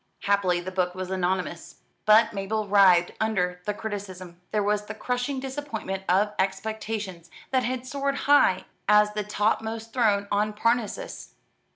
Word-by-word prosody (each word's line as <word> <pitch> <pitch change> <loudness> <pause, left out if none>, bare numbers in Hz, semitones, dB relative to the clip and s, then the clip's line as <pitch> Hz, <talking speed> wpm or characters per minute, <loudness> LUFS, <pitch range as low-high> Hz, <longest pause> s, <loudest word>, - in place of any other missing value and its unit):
Happily 195 -3 +2
the 180 +2 -6
book 180 -1 -1
was 185 0 -5
anonymous: 185 -2 -2 0.3
but 215 +2 +6
Mabel 210 +2 -2
writhed 190 -4 +5
under 180 -5 0
the 210 - -1
criticism. 185 -5 -7
There 210 -1 0
was 210 0 0
the 215 - -6
crushing 250 +4 -2
disappointment 260 -8 -5
of 205 +3 +3
expectations 205 -3 -3 0.2
that 260 -1 +2
had 255 +1 -3
soared 280 +1 -2
high 285 -10 +4 0.2
as 210 0 +5
the 210 0 -2
topmost 220 +2 -1
throne 205 -5 +2
on 210 +1 +1
Parnassus. 235 - -2
210 Hz, 145 wpm, -26 LUFS, 190-225 Hz, 0.3 s, but